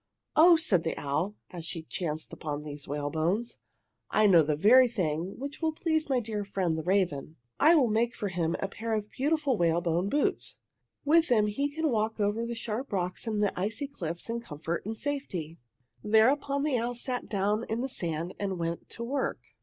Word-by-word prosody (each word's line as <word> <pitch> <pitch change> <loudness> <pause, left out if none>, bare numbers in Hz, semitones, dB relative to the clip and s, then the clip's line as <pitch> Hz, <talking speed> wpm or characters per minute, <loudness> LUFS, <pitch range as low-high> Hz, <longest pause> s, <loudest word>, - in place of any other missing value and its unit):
"Oh," 340 +2 +8
said 270 - +2
the 160 - -2
owl, 155 +9 -1 0.2
as 175 -2 -7
she 165 0 -5
chanced 155 -1 -4
upon 150 -1 -4
these 145 -1 -7
whalebones, 160 - -1 0.5
"I 215 - +3
know 180 -5 +7
the 150 0 +1
very 250 - +7
thing 180 -5 -2
which 280 +4 -6
will 320 -1 +1
please 315 -1 0
my 260 -2 +3
dear 215 -3 -3
friend 190 -4 -1
the 160 - -2
raven! 165 -5 0 0.2
"I 320 +4 +7
will 275 -6 +4
make 230 +2 +1
for 205 - -3
him 170 -2 -1
a 195 - -1
pair 220 +3 -3
of 210 -1 -4
beautiful 295 -2 +1
whalebone 170 +2 +1
boots! 290 +5 0 0.4
With 325 +3 +5
them 220 -4 +4
he 275 +8 -1
can 315 +2 -1
walk 220 0 0
over 210 +3 0
the 235 - -4
sharp 230 +3 -4
rocks 185 +2 -2
and 210 -2 0
the 205 - +1
icy 215 +8 -1
cliffs 170 - -5
in 230 0 -2
comfort 165 -3 -5
and 220 0 -4
safety!" 190 - -4 0.4
Thereupon 275 +6 +3
the 285 -5 +1
owl 240 +1 -2
sat 250 +1 -3
down 205 +2 0
in 225 +2 -1
the 265 - -1
sand 170 -7 -2
and 195 -2 -2
went 170 0 -4
to 235 - -7
work. 265 +3 -1
210 Hz, 195 wpm, -29 LUFS, 170-250 Hz, 0.5 s, Oh